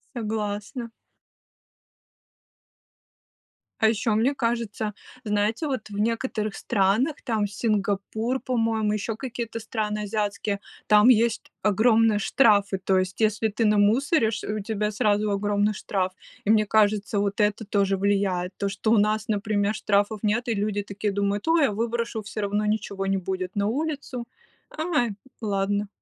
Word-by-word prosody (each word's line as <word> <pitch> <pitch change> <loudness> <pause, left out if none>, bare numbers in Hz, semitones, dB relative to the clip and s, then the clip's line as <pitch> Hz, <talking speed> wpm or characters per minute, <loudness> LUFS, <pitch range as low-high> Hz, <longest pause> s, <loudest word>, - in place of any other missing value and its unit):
Согласна. 215 +1 -3 2.9
А 220 - +6
ещё 220 0 0
мне 255 +6 +2
кажется, 230 -4 -2 0.3
знаете, 210 +6 0
вот 255 -6 -3
в 205 - -7
некоторых 220 -2 -1
странах, 220 +8 +1
там, 220 -3 0
Сингапур, 210 +4 -1
по-моему, 225 -4 0
ещё 215 +1 -2
какие-то 235 -2 -5
страны 215 -1 -3
азиатские, 205 -1 -2 0.3
там 210 +3 +6
есть 230 -1 +2
огромные 220 +1 +4
штрафы. 205 -4 +3
То 190 -1 +3
есть, 185 0 -3
если 215 +1 +2
ты 220 +2 -1
намусоришь, 220 +4 +2
э, 210 - -3
у 215 - -2
тебя 210 0 -2
сразу 210 0 +1
огромный 205 +1 +1
штраф. 190 -1 -2 0.3
И 210 - +4
мне 215 -1 +4
кажется, 210 0 +2
вот 200 +2 -1
это 210 +1 +1
тоже 195 -1 +1
влияет, 195 -2 0
то, 200 - -1
что 200 +3 -1
у 230 - +5
нас, 215 +1 +1
например, 205 -1 0
штрафов 205 +1 +1
нет, 220 +4 0
и 230 - +1
люди, 205 -1 -1
такие, 205 +1 -3
думают, 200 +3 -1
ой, 325 -2 +4
я 220 - +3
выброшу, 230 +1 -2
всё 210 +1 -6
равно 205 +1 0
ничего 200 -2 -2
не 195 0 +1
будет 185 0 -4
на 200 0 +1
улицу. 275 -2 -3 0.5
Ай, 310 -8 +1 0.3
ладно. 205 0 0
210 Hz, 145 wpm, -25 LUFS, 200-225 Hz, 2.9 s, А